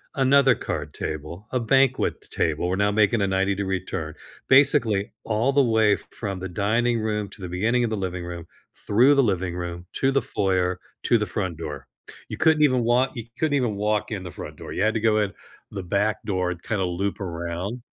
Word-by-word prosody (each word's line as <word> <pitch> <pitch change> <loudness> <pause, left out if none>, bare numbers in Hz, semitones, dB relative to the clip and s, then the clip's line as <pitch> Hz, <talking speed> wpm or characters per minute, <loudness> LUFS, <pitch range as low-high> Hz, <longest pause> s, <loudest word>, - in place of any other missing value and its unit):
another 135 0 +5
card 75 -1 -5
table, 80 +6 -6
a 130 - +1
banquet 130 +2 +2
table- 80 +2 -1
we're 90 - 0
now 100 +1 +2
making 105 +1 +3
a 100 - +2
ninety-degree 95 -1 0
turn- 80 -4 -5 0.3
basically, 130 -7 +4
all 115 +5 +1
the 140 0 +5
way 110 -3 +3
f - - -5
from 100 -4 -5
the 95 +1 -5
dining 115 +5 +1
room 105 -2 -2
to - - -14
the 90 - -4
beginning 110 +8 +1
of 120 - 0
the - - 0
living 90 -2 -4
room, 85 -1 -7 0.3
through 125 +7 +3
the 140 - +4
living 95 -5 -1
room, 85 0 -5
to 135 - +1
the 135 0 +2
foyer, 90 -2 0 0.2
to 120 - +4
the 105 - 0
front 95 -5 -3
door. 75 -4 -7 0.4
You - - -5
couldn't 155 -1 +4
even 130 -4 +3
walk 125 +3 +2
you 115 -3 -6
couldn't 155 -2 0
even 120 -6 0
walk 105 +1 -1
in 100 -3 -4
the 90 - -7
front - - -8
door, - - -8
you - - -2
had 110 +2 +2
to - - +1
go 110 -1 +3
in 100 -2 -1 0.4
the 95 -2 -6
back 100 +4 0
door 95 -3 0
and, 85 -1 -7
kinda 105 -4 -1
loop 95 +3 -2
around 90 +6 -4
105 Hz, 210 wpm, -24 LUFS, 90-120 Hz, 0.4 s, another